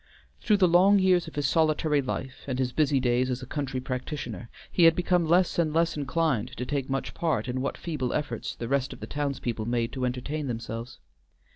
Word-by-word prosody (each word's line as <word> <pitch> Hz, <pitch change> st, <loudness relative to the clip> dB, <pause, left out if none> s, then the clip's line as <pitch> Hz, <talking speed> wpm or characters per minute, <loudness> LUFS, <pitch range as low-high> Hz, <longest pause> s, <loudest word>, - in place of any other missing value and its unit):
Through 210 Hz, -3 st, +3 dB
the 190 Hz, -2 st, +5 dB
long 185 Hz, +4 st, +6 dB
years 185 Hz, -3 st, +3 dB
of 160 Hz, -, -10 dB
his 145 Hz, -1 st, -1 dB
solitary 155 Hz, -1 st, +2 dB
life, 130 Hz, 0 st, -5 dB
and 130 Hz, -2 st, -2 dB
his 130 Hz, -1 st, 0 dB
busy 145 Hz, -3 st, +2 dB
days 125 Hz, 0 st, +1 dB
as 130 Hz, 0 st, -3 dB
a -, -, -5 dB
country 135 Hz, -1 st, -3 dB
practitioner, 125 Hz, -, -5 dB, 0.2 s
he 175 Hz, -, +4 dB
had 165 Hz, -1 st, +7 dB
become 180 Hz, -1 st, +1 dB
less 175 Hz, +1 st, +3 dB
and 160 Hz, -2 st, +2 dB
less 165 Hz, +2 st, +1 dB
inclined 145 Hz, -5 st, -1 dB
to 125 Hz, -, -3 dB
take 135 Hz, 0 st, -2 dB
much 135 Hz, 0 st, -2 dB
part 155 Hz, -9 st, -1 dB
in 130 Hz, +1 st, -2 dB
what 140 Hz, -, -2 dB
feeble 145 Hz, -7 st, -3 dB
efforts 135 Hz, -6 st, -3 dB
the 115 Hz, -, -5 dB
rest 135 Hz, 0 st, 0 dB
of -, -, -12 dB
the -, -, -6 dB
townspeople 135 Hz, -6 st, -3 dB
made 120 Hz, 0 st, 0 dB
to 130 Hz, -, -4 dB
entertain 140 Hz, +4 st, -3 dB
themselves. 115 Hz, 0 st, -5 dB
140 Hz, 210 wpm, -27 LUFS, 125-160 Hz, 0.2 s, had